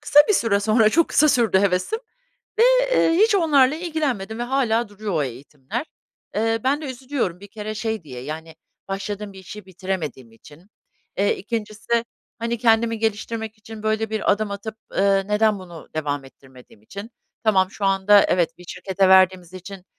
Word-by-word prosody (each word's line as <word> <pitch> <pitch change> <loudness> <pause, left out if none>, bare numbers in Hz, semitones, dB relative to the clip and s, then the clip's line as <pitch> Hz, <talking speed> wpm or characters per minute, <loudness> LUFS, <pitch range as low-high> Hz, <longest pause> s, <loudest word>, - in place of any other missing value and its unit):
kısa 295 0 +6
bir 420 - +4
süre 200 - +2
sonra, 215 +1 +4
çok 335 +5 +3
kısa 305 +1 +4
sürdü 230 -8 +3
hevesim 195 - +1 0.6
ve, - - +7 0.3
ııı, 330 - +4
hiç 435 -1 +5
onlarla 295 -6 +4
ilgilenmedim 290 - -3
ve - - -1
hâlâ 240 -3 0
duruyor 205 -1 -5
o 155 -3 +1
eğitimler. 140 - -6 0.5
Iıı, 225 +1 +1
ben 280 +4 +1
de - - -5
üzülüyorum 250 -8 -3
bir 200 - -12
kere 215 +1 -6
şey 220 -3 -3
diye, 125 -4 -9
yani, 160 +2 -7 0.3
başladığım 200 +1 -5
bir 190 - -11
işi 190 +2 -10
bitiremediğim 170 -10 -5
için. 150 - -17 0.5
Eee, 200 +1 +2
ikincisi, 225 +2 -2 0.3
hani, 235 +1 -2
kendimi 230 -1 +2
geliştirmek 220 0 -3
için 215 0 -11
böyle 220 0 0
bir 220 -1 +1
adım 205 0 -1
atıp, 210 +2 -6 0.2
ııı, 195 0 +2
neden 210 -1 +2
bunu 175 -3 -11
devam 145 -3 -2
ettirmediğim 130 -5 -18
için. 200 - -9 0.3
Tamam, 190 -4 +3
şu 205 - -4
anda 195 +1 +5
evet, 175 -2 +1
bir 180 - -14
şirkete 190 +1 0
verdiğimiz 185 -2 +4
için 185 0 -10
210 Hz, 170 wpm, -22 LUFS, 185-230 Hz, 0.6 s, ve